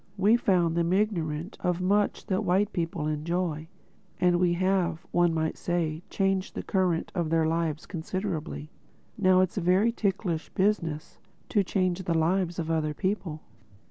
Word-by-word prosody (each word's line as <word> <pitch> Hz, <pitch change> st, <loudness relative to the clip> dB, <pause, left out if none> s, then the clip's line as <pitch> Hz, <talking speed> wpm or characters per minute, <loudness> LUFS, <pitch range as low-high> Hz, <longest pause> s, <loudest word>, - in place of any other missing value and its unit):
We 205 Hz, +4 st, +5 dB
found 180 Hz, -8 st, +2 dB
them 170 Hz, +1 st, +1 dB
ignorant 175 Hz, -4 st, -1 dB
of 180 Hz, -1 st, 0 dB
much 200 Hz, +3 st, +1 dB
that 190 Hz, +3 st, 0 dB
white 195 Hz, +3 st, +1 dB
people 165 Hz, -2 st, -2 dB
enjoy. 155 Hz, +1 st, -2 dB, 0.5 s
And 175 Hz, -1 st, +3 dB
we 180 Hz, -1 st, +3 dB
have, 180 Hz, -2 st, 0 dB
one 175 Hz, -1 st, +3 dB
might 160 Hz, -1 st, -1 dB
say, 165 Hz, -2 st, -1 dB
changed 195 Hz, -1 st, 0 dB
the -, -, -4 dB
current 180 Hz, -4 st, 0 dB
of 170 Hz, -4 st, -1 dB
their 165 Hz, 0 st, +2 dB
lives 160 Hz, -1 st, -1 dB
considerably. 165 Hz, -3 st, -4 dB, 0.4 s
Now 185 Hz, -4 st, +4 dB
it 185 Hz, -1 st, +1 dB
is -, -, -3 dB
a -, -, -3 dB
very 185 Hz, +6 st, +3 dB
ticklish 190 Hz, -7 st, -2 dB
business, 170 Hz, -6 st, -1 dB, 0.3 s
to 205 Hz, -, +3 dB
change 185 Hz, -1 st, 0 dB
the 170 Hz, -2 st, 0 dB
lives 175 Hz, +2 st, +1 dB
of 165 Hz, -2 st, -2 dB
other 155 Hz, -2 st, 0 dB
people. 185 Hz, -5 st, -2 dB
175 Hz, 160 wpm, -27 LUFS, 165-190 Hz, 0.5 s, We